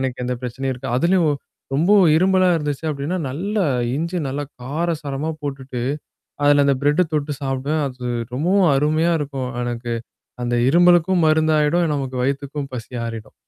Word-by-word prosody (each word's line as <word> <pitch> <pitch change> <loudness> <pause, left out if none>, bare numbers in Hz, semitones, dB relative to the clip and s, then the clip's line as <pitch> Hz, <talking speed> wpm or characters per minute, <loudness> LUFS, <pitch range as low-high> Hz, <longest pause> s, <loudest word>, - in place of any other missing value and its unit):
எனக்கு 130 -1 -2
எந்த 125 0 -1
பிரச்சனையும் 130 +2 -3
இருக்கா. 125 - -6
அதுலயும் 170 0 +3 0.4
ரொம்ப 170 +9 +3 0.2
இரும்மலா 185 +1 +4
இருந்துச்சு 150 -1 -3
அப்படின்னா, 145 +5 -3
நல்ல 190 +10 -4 0.4
இஞ்சு 170 +4 -2
நல்லா 145 +2 -3 0.2
கார 160 +7 -2
சாரமா 145 +2 -3
போட்டுட்டு, 135 -3 -5 0.6
அதுல 145 0 +5
அந்த 140 - +3
பிரெட்ட 150 +5 +3
தொட்டு 150 -1 -1
சாப்பிடுவேன். 140 +3 -1
அது 125 -1 -7 0.3
ரொம்பவும் 180 +6 +3
அருமையா 155 +4 +2
இருக்கும் 135 -3 -4
எனக்கு 120 0 -3 0.5
அந்த 120 0 0
இரும்மலுக்கும் 175 +2 +4
மருந்தாயிடும். 155 +1 +3
நமக்கு 135 -3 -3
வயித்துக்கும் 140 +1 -3
பசி 120 0 -7
ஆறிடும். 115 -2 -7
145 Hz, 140 wpm, -21 LUFS, 130-165 Hz, 0.6 s, அதுல